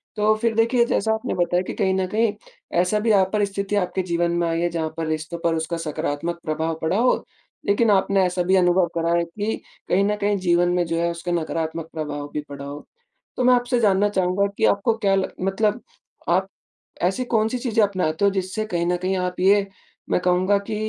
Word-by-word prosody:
तो 215 0 +3
फिर 230 -1 +1
देखिए 235 +1 +3
जैसा 220 -1 +1
आपने 220 - -3
बताया 175 0 +1
कि - - -5
कहीं 190 -3 +1
न 190 0 0
कहीं 220 0 +2 0.5
ऐसा 210 +4 +1
भी 225 +1 +1
अ, 195 -2 +5
परिस्थिति 200 -1 -1
आपके 190 -1 0
जीवन 170 -1 0
में 170 - +1
आई 165 0 -1
है 175 - +1
जहाँ 165 -2 -2
पर 165 - -2
रिश्तों 155 +2 -3
पर 165 -1 +2
उसका 160 +1 -2
सकारात्मक 165 +1 -3
प्रभाव 160 +1 -1
पड़ा 160 +5 0
होI 245 +2 +3 0.5
लेकिन 215 +3 +2
आपने 195 -1 +3
ऐसा 180 0 0
भी 190 +2 +2
अनुभव 180 -1 +4
करा 170 0 +1
है 170 - +2
कि 205 +6 -3 0.3
कहीं 195 +2 +3
न 210 - +1
कहीं 205 0 +1
जीवन 175 +1 +4
में 180 - +2
जो 165 0 -2
है 170 - +1
उसका 170 +1 -5
नकारात्मक 165 -1 -2
प्रभाव 145 -2 -4
भी 150 - -2
पड़ा 140 0 -7
होI 145 +1 -7 0.5
तो 250 - +1
मैं 250 - +6
आपसे 245 0 +1
जानना 205 -2 +3
चाहूँगा 190 0 +1
कि - - +2
आपको 200 +3 +2
क्या 200 -3 +2
लग 190 -1 -1
मतलब 210 +4 0 0.5
आप 185 +3 +2 0.6
ऐसी 195 +8 -1
कौन-सी 225 +2 +2
चीज़ें 225 -3 +1
अपनाते 185 -3 0
हो 200 - +4
जिससे 190 +3 -2
कहीं 170 -5 -1
न 175 +1 +1
कहीं 185 +1 0
आप 180 0 -3
ये 195 +2 +4 0.4
मैं - - +2
कहूँगा 185 +3 +2
कि 215 - -2
185 Hz, 215 wpm, -23 LUFS, 170-205 Hz, 0.6 s, मैं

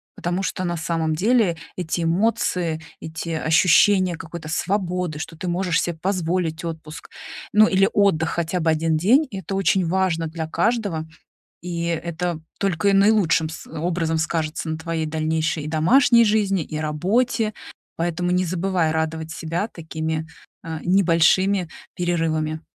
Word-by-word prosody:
потому 175 +2 -2
что 185 -1 -3
на 175 -1 -2
самом 160 -1 -1
деле 205 0 +2 0.2
эти 175 -1 -2
эмоции, 170 -2 0 0.2
эти 160 +1 -6
ощущения 175 +3 +4
какой-то 165 0 -8
свободы, 180 -2 -1
что 165 +1 -6
ты 180 - -5
можешь 175 -2 +1
себе 175 - -2
позволить 175 -3 -1
отпуск, 160 -1 -7 0.4
ну 215 +1 +7
или 195 0 +3
отдых 195 -6 +2
хотя 170 +1 -1
бы 160 -1 +2
1 160 0 +1
день- 245 - +4
это 195 -2 -5
очень 195 -1 +2
важно 170 -1 0
для 160 0 -4
каждого, 175 -2 -1 0.5
и 170 -1 -4
это 170 0 -2 0.2
только 195 0 +1
и - - +4
наилучшим 195 -5 +3
с 160 - -9
образом 165 0 -1
скажется 160 0 -2
на 160 0 -3
твоей 160 -1 -3
дальнейшей 160 0 -1
и - - -5
домашней 235 - +5
жизни 205 -4 +2
и 155 0 -6
работе. 210 +9 0 0.4
Поэтому 175 +1 -1
не 180 +1 +2
забывай 180 -2 0
радовать 160 0 -2
себя 165 +4 -3
такими, 160 -4 -4 0.4
э, 160 -1 -4
небольшими 185 +1 +3 0.3
перерывами. 160 -3 -1
170 Hz, 140 wpm, -22 LUFS, 160-190 Hz, 0.5 s, ну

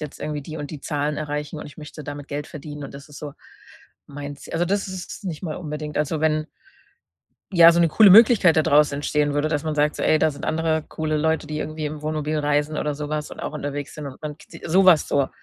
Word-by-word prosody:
jetzt 150 -2 -8
irgendwie 150 -2 -3
die 155 +2 -8
und 145 -2 -6
die 150 -3 -7
Zahlen 145 0 -2
erreichen 150 0 -4
und - - -7
ich 145 - -13
möchte 150 -1 -10
damit 145 0 -7
Geld 145 +1 -4
verdienen 150 -1 -8
und 135 - -10
das 140 +2 -11
ist 145 - -11
so 145 -1 -7 0.7
mein 145 0 -7
Z“ - - -10
Also, 170 - +2
das 200 +1 -1
ist 185 -1 -7
es - - -9
nicht 165 -3 -5
mal 155 -4 -4
unbedingt. 150 -3 -5
Also, 150 +1 -1
wenn 155 0 +1 1.1
ja, 170 -1 +9
so 170 - +2
'ne 170 - +5
coole 210 +5 +6
Möglichkeit 205 -4 +7
da 155 - +6
draus 150 0 +4
entstehen 145 +1 0
würde, 145 +1 +1
dass 150 -2 -1
man 155 -1 -2
sagt, 150 0 +1
so: - - -3
„Ey, 155 - +4
da 155 0 +3
sind 140 - -11
andere 160 -1 0
coole 155 -1 -2
Leute, 160 0 0
die 150 - -4
irgendwie 155 0 -4
im 150 0 -5
Wohnmobil 155 0 -2
reisen 150 +1 0
oder 150 -1 -1
sowas 150 +1 -4
und - - -10
auch - - -5
unterwegs 145 -1 -5
sind 150 -1 -7
und 135 - -9
man 150 -1 -6
kt“ 165 - -14
sowas 185 -2 +5
so. 140 -2 +1
150 Hz, 245 wpm, -23 LUFS, 145-160 Hz, 1.1 s, ja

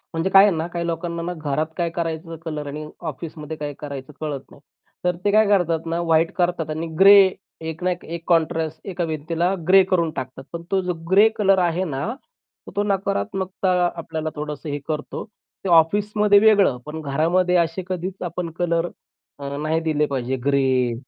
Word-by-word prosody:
म्हणजे 165 +4 0
काय 195 +1 +8
आहे 205 - +4
ना, 160 +2 -2
काही 170 -1 -4
लोकांना 170 0 -3
ना 175 +1 -3
घरात 155 -1 -1
काय 170 -1 0
करायचं 165 -1 -4
कलर 150 -2 -4
आणि 150 +2 -5 0.3
ऑफिसमध्ये 155 +1 -8
काय 145 -1 -4
करायचं 140 0 -7
कळत 145 -3 -3
नाही. - - -16 0.4
तर 180 -1 +1
ते 205 - +4
काय 215 0 +5
करतात 170 -5 +2
ना, 165 +1 -1
व्हाईट 165 0 +2
करतात 175 -3 0
आणि 160 +2 -3
ग्रे, 200 +1 +9 0.5
एक 160 +2 -6
ना 185 - +2
एक 180 - -5
एक 170 0 -6
कॉन्ट्रास्ट 160 -1 +1
एका 180 -2 -2
भिंतीला 165 +4 -1
ग्रे 190 0 +7
करून 170 -3 +2
टाकतात. 130 0 -6
पण 170 - -4
तो 190 -1 +2
जो 180 -1 -2 0.2
ग्रे 205 +3 +7
कलर 195 -2 +4
आहे 175 +1 +1
ना, 145 +1 -3 0.6
तर - - -8
तो 205 - +1
नकारात्मकता 190 - -1 0.2
आपल्याला 160 -1 -4
थोडंसं 150 +1 -5
हे 145 0 -3
करतो. 150 -1 -4
ते 200 -2 -11
ऑफिसमध्ये 205 +5 +4
वेगळं, 205 - +4
पण 155 +1 -6
घरामध्ये 170 +6 +1
असे 170 +2 0
कधीच 185 +1 -4
आपण 175 0 -4
कलर 170 0 +1 0.5
अ, 140 0 -5
नाही 155 +2 0
दिले 150 -2 +1
पाहिजे. 130 -2 -2
ग्रे 130 -3 +2
165 Hz, 180 wpm, -22 LUFS, 150-180 Hz, 0.6 s, ग्रे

